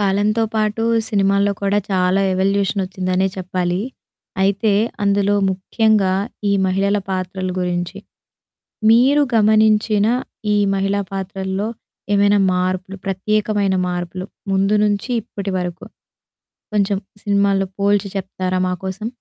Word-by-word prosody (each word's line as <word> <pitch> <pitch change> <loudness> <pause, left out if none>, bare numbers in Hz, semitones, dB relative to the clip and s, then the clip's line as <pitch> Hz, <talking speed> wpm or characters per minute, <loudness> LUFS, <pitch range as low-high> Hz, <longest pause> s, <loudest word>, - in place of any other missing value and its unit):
కాలంతో 205 +3 +1
పాటు 215 0 0 0.3
సినిమాల్లో 200 0 +2
కూడా 200 +1 +2
చాలా 185 0 +2
ఎవల్యూషన్ 195 +1 +1
వచ్చిందనే 185 0 -1
చెప్పాలి. 180 -1 -2 0.6
అయితే 200 +2 +2 0.3
అందులో 200 0 +2 0.2
ముఖ్యంగా 195 +1 +1 0.4
ఈ - - +3
మహిళల 195 +2 +1
పాత్రల 185 0 -3
గురించి. 175 +1 -2 0.9
మీరు 260 +6 +5
గమనించిన 215 -1 +3 0.5
ఈ - - +3 0.2
మహిళా 195 +1 0
పాత్రల్లో 195 +1 -3 0.5
ఏమైనా 205 0 +4 0.2
మార్పులు 185 +1 -2
ప్రత్యేకమైన 200 0 0
మార్పులు 180 +1 -4 0.3
ముందు 195 +2 +2
నుంచి 205 +3 0
ఇప్పటి 200 -1 -6
వరకు 180 -1 -4 0.9
కొంచెం 200 -1 +1 0.3
సినిమాల్లో 200 -1 +2
పోల్చి 200 0 +2
చెప్తారా 185 -1 -2
మాకోసం? 190 +3 -4
195 Hz, 105 wpm, -19 LUFS, 185-205 Hz, 0.9 s, మీరు